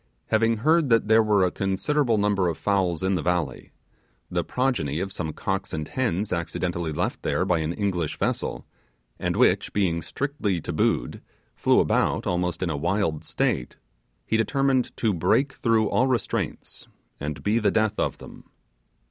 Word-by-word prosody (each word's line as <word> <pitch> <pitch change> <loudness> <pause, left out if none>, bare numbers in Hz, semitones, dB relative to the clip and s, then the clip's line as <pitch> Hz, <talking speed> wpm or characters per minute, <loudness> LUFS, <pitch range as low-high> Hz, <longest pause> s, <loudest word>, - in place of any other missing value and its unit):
Having 115 +1 +2
heard 155 +4 +3
that 115 -3 +3
there 110 0 +6
were 105 -3 +3
a 90 - 0
considerable 115 +6 0
number 100 -3 +2
of 85 -2 -2
fowls 95 -4 0
in 95 +1 +1
the 90 - 0
valley 85 -7 -2 0.6
the 85 -1 0
progeny 125 - -1
of 95 +1 -3
some 80 -4 -4
cocks 95 +5 -3
and 80 -1 -3
hens 110 -7 -1
accidentally 85 -1 -2
left - - -2
there - - 0
by 85 -2 +2
an 80 +1 -1
English 90 -5 -2
vessel, - - -2 0.5
and - - -1
which, - - +3
being 90 -5 +1
strictly 125 - -2
tabooed, 60 -5 -1 0.3
flew - - +3
about - - +1
almost 90 -1 -1
in 90 - -1
a - - -2
wild 85 0 0
state - - -1 0.5
he 110 - +1
determined 135 +2 +1
to 110 -3 +1
break 135 - +2
through 115 -2 +2
all 130 - +3
restraints, 125 -5 -3 0.3
and 75 +1 -5
be 105 +3 +2
the 105 - +2
death 110 -2 +1
of - - 0
them. - - -13
95 Hz, 165 wpm, -25 LUFS, 85-115 Hz, 0.6 s, there